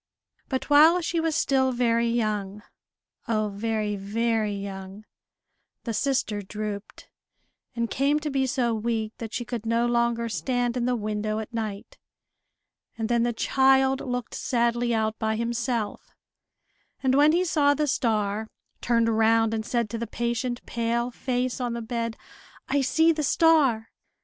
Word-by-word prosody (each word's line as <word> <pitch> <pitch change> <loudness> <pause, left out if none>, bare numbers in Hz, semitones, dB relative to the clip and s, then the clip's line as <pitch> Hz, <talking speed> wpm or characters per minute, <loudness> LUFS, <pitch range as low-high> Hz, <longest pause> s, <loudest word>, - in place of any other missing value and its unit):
But 260 -2 -2
while 310 +4 +6
she 335 0 -1
was 325 -1 0
still 265 -1 +2
very 235 -1 +1
young, 210 -3 -2 0.6
oh 215 -2 0
very, 210 0 -2
very 215 +1 -1
young, 195 +1 -7 0.8
the 230 - -3
sister 220 -4 0
drooped, 210 +1 -6 0.7
and 235 -1 0
came 280 +5 +1
to 300 -1 -3
be 270 -1 +1
so 240 -2 0
weak 220 0 -2
that 225 -2 -6
she 240 - -3
could 235 -2 -4
no 230 +1 +1
longer 235 -1 +1
stand 245 +1 -1
in 245 -1 -1
the 250 0 +1
window 215 -1 -2
at 220 +2 -6
night; 215 -3 -5 1.0
and 225 0 -2
then 235 -1 +2
the 240 +1 +1
child 265 +2 +3
looked 245 -2 -4
sadly 240 -2 0
out 220 -1 0
by 220 -1 0
himself, 235 -1 -2 0.9
and 260 -1 +3
when 290 +3 +5
he 355 +3 +2
saw 290 -4 +3
the 300 - 0
star, 220 -5 0 0.3
turned 230 -1 +2
round 225 0 +3
and 220 0 -3
said 235 -2 0
to 230 - -3
the 235 - -3
patient 240 +2 -3
pale 235 +1 -1
face 255 +1 -2
on 240 -1 -1
the 235 - -3
bed, 230 -1 -3 0.5
"I 280 +1 +1
see 320 +5 +3
the 310 -1 -1
star!" 285 -7 +3
235 Hz, 155 wpm, -26 LUFS, 220-255 Hz, 1.0 s, while